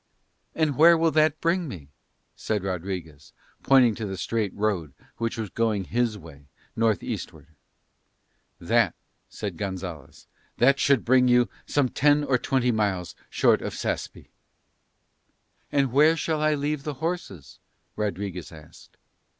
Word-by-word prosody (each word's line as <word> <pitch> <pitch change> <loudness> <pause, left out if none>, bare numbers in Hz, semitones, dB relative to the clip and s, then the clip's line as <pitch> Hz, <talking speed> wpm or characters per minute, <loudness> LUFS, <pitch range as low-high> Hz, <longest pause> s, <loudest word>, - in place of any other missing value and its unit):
"And 155 -4 0
where 165 +2 +7
will 165 0 +2
that 155 -1 +2
bring 170 +1 +1
me?" 80 - -9 0.5
said 105 -3 -2
Rodriguez, 90 -5 -5 0.3
pointing 130 -4 +5
to 105 0 -5
the 95 -1 -5
straight 110 -2 -2
road 95 -9 -2 0.2
which 115 -1 -2
was 110 -5 -4
going 110 -4 0
his 115 +1 -1
way, 75 -6 -14 0.3
north 110 -3 +1
eastward. - - -6 1.1
"That," - - +2 0.3
said 100 -5 -6
Gonzalez, 90 -7 -6 0.3
"that 135 +3 +4
should 140 -4 +2
bring 125 +1 +4
you 125 -1 +4 0.2
some 145 -3 +2
ten 145 +3 +3
or 130 -3 +1
twenty 125 -1 +1
miles 100 -5 -1 0.2
short - - +3
of - - -5
Saspe." - - -4 1.4
"And 140 -3 +1
where 155 +5 +4
shall 160 -1 -1
I 155 0 +2
leave 145 0 -2
the 150 0 -5
horses?" 155 - -5 0.4
Rodriguez 100 -4 -4
asked. 80 -2 -16
115 Hz, 135 wpm, -25 LUFS, 95-145 Hz, 1.4 s, where